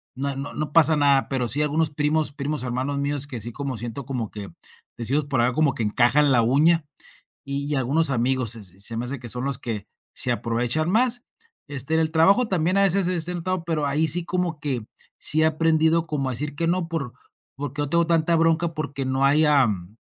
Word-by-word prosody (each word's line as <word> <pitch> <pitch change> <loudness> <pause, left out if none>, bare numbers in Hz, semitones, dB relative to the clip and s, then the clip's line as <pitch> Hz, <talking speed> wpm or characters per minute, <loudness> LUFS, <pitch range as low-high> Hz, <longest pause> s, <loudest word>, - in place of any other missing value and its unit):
no 140 +1 -2
no 140 +1 -6
no 155 -1 -4
pasa 160 0 +5
nada, 140 -2 +3
pero 130 -3 -1
sí 145 +6 -1
algunos 155 +2 +1
primos, 150 0 0
primos 145 +1 -3
hermanos 130 +3 -2
míos 140 0 -1
que 125 -5 -6
sí 120 +3 -5
como 135 0 -4
siento 120 +4 -6
como 125 -6 -3
que, 100 -2 -7 0.5
decimos 135 +6 0
por 135 -4 0
acá, 125 +1 +2
como: 155 -3 +2
"Que 115 - -5
encajan 130 +7 +3
la 120 - +5
uña". 150 +7 +3 0.6
Y 140 +1 -4
y - - +1
algunos 140 +4 +2
amigos 125 -1 +1
se 115 -2 -5
se 95 0 -12
se 115 +3 -4
me 120 - -2
hace 135 +3 -4
que 120 0 -8
son 125 +3 -2
los 140 -2 0
que 115 -6 -5 0.3
se 125 - -1
aprovechan 120 +8 0
más. 245 +3 +2 0.4
Este, 140 +1 -4
en 160 - +3
el 160 0 0
trabajo 195 +9 +4
también 180 +1 +1
a 200 - +4
veces 195 0 +2
se 180 0 0
es 165 - -1
sentado, 180 +1 -3
pero 160 -3 -1
ahí 150 +3 +1
sí 175 +1 0
como 175 -4 -2
que, 130 -6 -3 0.3
sí 155 - 0
he - - +5
aprendido 160 +1 +2
como 150 -4 -2
a - - -2
decir 145 +4 -4
que 165 +3 -1
no, 175 -1 0
por 150 -7 -4 0.4
porque 145 +1 -4
no 145 - -2
tengo 170 +1 +2
tanta 165 0 +2
bronca 165 +1 +2
porque 140 -3 -4
no 130 +1 0
hay, 150 +3 +4
am, 110 - +2
145 Hz, 225 wpm, -24 LUFS, 130-160 Hz, 0.6 s, pasa